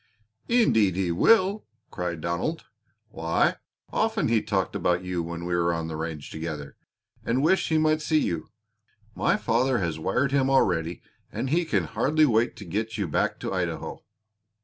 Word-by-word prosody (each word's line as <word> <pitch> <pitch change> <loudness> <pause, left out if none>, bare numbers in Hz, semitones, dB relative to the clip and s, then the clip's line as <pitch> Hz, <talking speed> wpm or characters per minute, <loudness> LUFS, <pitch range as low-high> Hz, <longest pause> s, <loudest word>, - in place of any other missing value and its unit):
"Indeed 110 - +3
he 95 -2 0
will!" 200 - +3 0.2
cried 85 -2 -4
Donald. 85 - -2 0.4
"Why, 80 -5 +1 0.4
often - - +1
he 115 -2 +3
talked 95 -5 -1
about 90 +1 +1
you 90 -1 -2
when 85 +1 -5
we 90 - -2
were 85 0 +2
on 85 -1 -3
the 80 - -4
range 80 -2 -5
together, 80 -3 -6 0.5
and 125 +4 0
wished 190 +5 +2
he 160 - +3
might 155 0 +2
see 155 +1 +1
you. 85 - -2 0.6
My - - +1
father 125 +2 +1
has 85 -6 -2
wired 125 - 0
him 135 -1 +2
already 90 -10 +1 0.3
and 130 - -3
he 170 +2 +2
can 155 - +1
hardly 155 +2 +2
wait 115 -3 +2
to 100 - -10
get 110 +6 -3
you 100 -4 -1
back 75 - 0
to - - -3
Idaho." - - -3
100 Hz, 170 wpm, -26 LUFS, 85-140 Hz, 0.6 s, Indeed